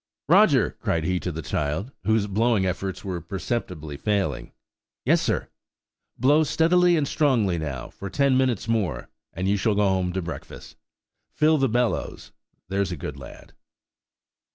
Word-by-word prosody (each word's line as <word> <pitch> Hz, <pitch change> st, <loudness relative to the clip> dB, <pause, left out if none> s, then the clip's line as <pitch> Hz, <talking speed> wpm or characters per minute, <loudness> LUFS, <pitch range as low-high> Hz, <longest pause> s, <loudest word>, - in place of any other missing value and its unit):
"Roger," -, -, +5 dB
cried 80 Hz, -1 st, -1 dB
he 90 Hz, +2 st, 0 dB
to 90 Hz, -, -4 dB
the 80 Hz, 0 st, -6 dB
child, 75 Hz, -, -2 dB
whose 110 Hz, 0 st, +2 dB
blowing 105 Hz, 0 st, +1 dB
efforts 95 Hz, +1 st, -3 dB
were 90 Hz, -3 st, -3 dB
perceptibly 85 Hz, -5 st, -4 dB
failing. 95 Hz, -, -1 dB, 0.5 s
"Yes, -, -, +4 dB
sir!" -, -, -1 dB, 0.7 s
"Blow 145 Hz, +4 st, +4 dB
steadily 175 Hz, +3 st, +3 dB
and 145 Hz, -2 st, 0 dB
strongly 115 Hz, -, +1 dB
now, 70 Hz, -5 st, -5 dB
for 100 Hz, -, -8 dB
ten 140 Hz, +2 st, +2 dB
minutes 130 Hz, -5 st, +1 dB
more, 100 Hz, -, -1 dB, 0.2 s
and 90 Hz, +2 st, -3 dB
you 100 Hz, +1 st, +2 dB
shall 105 Hz, +2 st, +1 dB
go 105 Hz, 0 st, +3 dB
home 95 Hz, -2 st, +1 dB
to 95 Hz, -, -1 dB
breakfast. 85 Hz, -1 st, -8 dB, 0.5 s
Fill 155 Hz, 0 st, +2 dB
the 135 Hz, -1 st, +2 dB
bellows, 120 Hz, +1 st, -1 dB, 0.4 s
there's 95 Hz, 0 st, -1 dB
a 90 Hz, -, -4 dB
good 75 Hz, 0 st, -6 dB
lad." 65 Hz, -2 st, -12 dB
100 Hz, 155 wpm, -24 LUFS, 85-120 Hz, 0.7 s, Roger